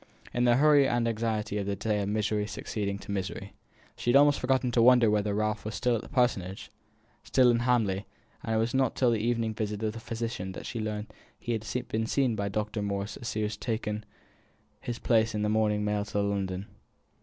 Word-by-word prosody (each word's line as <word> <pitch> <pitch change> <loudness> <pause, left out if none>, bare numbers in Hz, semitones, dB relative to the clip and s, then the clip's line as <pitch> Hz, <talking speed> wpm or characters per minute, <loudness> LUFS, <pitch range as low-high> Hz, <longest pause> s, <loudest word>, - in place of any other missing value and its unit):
In 120 0 +2
the 120 -1 +5
hurry 145 0 +5
and 120 -1 +1
anxiety 110 -2 -1
of 100 - -3
this 100 - -1
day 105 0 0
of 100 - -2
misery 105 0 0
succeeding 100 -2 -3
to 100 - -8
misery, 100 0 -4 0.4
she 120 +2 +1
almost 145 0 +6
forgot 130 +1 +1
to 115 - +4
wonder 120 -2 +6
whether 105 -1 +1
Ralph 110 0 -1
were 110 - -3
still 120 +3 0
at 110 - -2
the - - -12
Parsonage 100 -8 0 0.5
still 125 -2 +4
in 115 - +2
Hamley; 110 -5 +1 0.4
it 110 - -1
was 115 +1 +1
not 130 -2 +1
till 125 -2 +3
the 115 - +1
evening 115 0 0
visit 105 -1 -3
of 110 -1 0
the 115 - -7
physician 115 -5 -4
that - - -8
she 115 - -4
learnt 110 0 -3
that - - -21 0.2
he 120 - -5
had 115 +2 -3
been 110 +1 -1
seen 130 -2 +1
by 100 -1 -2
Dr. 105 +1 -2
Moore 100 -1 -1
as 115 +3 -6
he 110 - -1
was 105 0 -3
taking 110 -2 -3 0.8
his 120 -1 -4
place 110 -3 +2
in 105 - -1
the 105 - +1
morning 105 -1 +1
mail 105 0 0
to 105 0 -2
London. 100 -2 -1
110 Hz, 210 wpm, -29 LUFS, 105-120 Hz, 0.8 s, almost